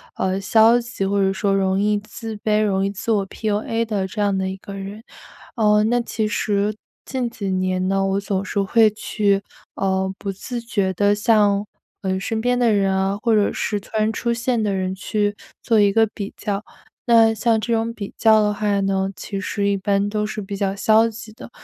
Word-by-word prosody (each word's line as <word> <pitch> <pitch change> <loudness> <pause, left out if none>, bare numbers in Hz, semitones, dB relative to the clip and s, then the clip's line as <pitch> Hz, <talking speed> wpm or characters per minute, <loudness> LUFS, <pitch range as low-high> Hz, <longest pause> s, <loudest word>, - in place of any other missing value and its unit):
呃， 190 +1 -1
消 225 +4 +5
极， 235 -5 -4
或 200 0 +1
者 195 - +2
说 195 +1 0
容 190 -1 +1
易 210 0 +2
自 220 +1 -8
卑、 215 0 +1
容 195 -2 +1
易 195 - 0
自 205 +3 -3
我 200 -3 +1
PUA 220 +3 -2
的 205 -4 -2
这 210 +2 -4
样 200 -1 +2
的 190 0 -1
一 190 - -5
个 200 +1 -10
人。 200 +3 -7 0.5
呃， 210 -2 +3
那 240 +3 +2
其 220 -2 -2
实 210 0 0 0.3
近 255 -2 -2
几 205 -4 -5
年 185 0 0
呢， 195 0 +1
我 195 0 0
总 195 -1 -2
是 200 +1 -1
会 220 +3 +4
去， 205 -1 0 0.3
呃， 190 0 0
不 200 - -4
自 240 +5 -6
觉 205 -5 -1
地 205 +2 +2
向， 205 -1 +3 0.4
呃， 190 -1 -1
身 220 +3 -2
边 245 +1 +1
的 235 -3 +3
人 195 -1 +2
啊， 190 +1 0
或 230 -2 +3
者 210 -2 +2
是 210 - -2
突 200 - -18
然 215 0 +2
出 235 +1 -1
现 235 0 0
的 205 -2 0
人， 185 -1 -1
去 205 +1 -1 0.3
做 225 -2 +3
一 200 -1 +4
个 225 +1 +5
比 200 -2 -6
较。 205 0 -3 0.4
那 225 -2 +5
像 225 +1 +1
这 235 - -1
种 225 +1 0
比 200 -4 -7
较 220 -1 +5
的 210 0 +1
话 205 -1 0
呢， 195 0 0
其 200 +2 -5
实 200 0 -1
一 200 - +1
般 200 +1 0
都 210 0 -1
是 215 0 -4
比 200 0 -6
较 195 -1 -1
消 220 +3 +4
极 220 0 -10
的。 225 - -11
205 Hz, 235 characters per minute, -21 LUFS, 195-220 Hz, 0.5 s, 消